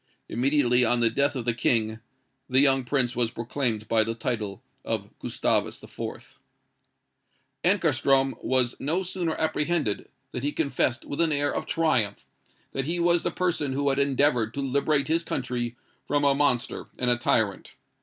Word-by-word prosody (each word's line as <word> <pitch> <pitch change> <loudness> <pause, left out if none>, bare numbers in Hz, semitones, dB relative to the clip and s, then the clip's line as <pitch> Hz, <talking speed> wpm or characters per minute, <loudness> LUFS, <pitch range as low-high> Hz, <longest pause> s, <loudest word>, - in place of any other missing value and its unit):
Immediately 125 0 +2
on 120 0 +2
the 115 -1 +4
death 140 +4 +1
of 125 -3 -4
the 120 - +2
King, 110 -1 +1 0.5
the 130 +1 +4
young 135 -1 +4
prince 125 -1 0
was 120 -2 +1
proclaimed 115 -2 -3
by 110 -1 +3
the 115 +1 -3
title 110 -4 -3 0.2
of - - -3
Gustavus - - -1
IV. - - -8 1.2
"Ankarstrom 135 -7 +3
was 125 -2 +1
no 165 +7 -1
sooner 175 -3 -2
apprehended, 155 -7 0 0.2
than 125 - -4
he 145 +2 -1
confessed 130 -5 0
with 145 - -2
an 165 -2 +3
air 145 -1 +1
of - - -3
triumph, 120 - 0 0.5
that 135 - -3
he 170 +3 -1
was 170 0 +3
the - - -1
person 165 -7 -1
'who 140 +1 +1
had 135 0 +1
endeavoured 135 -5 +2
to 140 - -2
liberate 140 +2 +1
his 165 +2 +1
country 120 -4 -3 0.3
from 145 0 +1
a 140 -1 +4
monster 135 -4 0
and 125 -1 +2
a 120 - +3
tyrant.' 110 -4 0
135 Hz, 165 wpm, -26 LUFS, 120-145 Hz, 1.2 s, the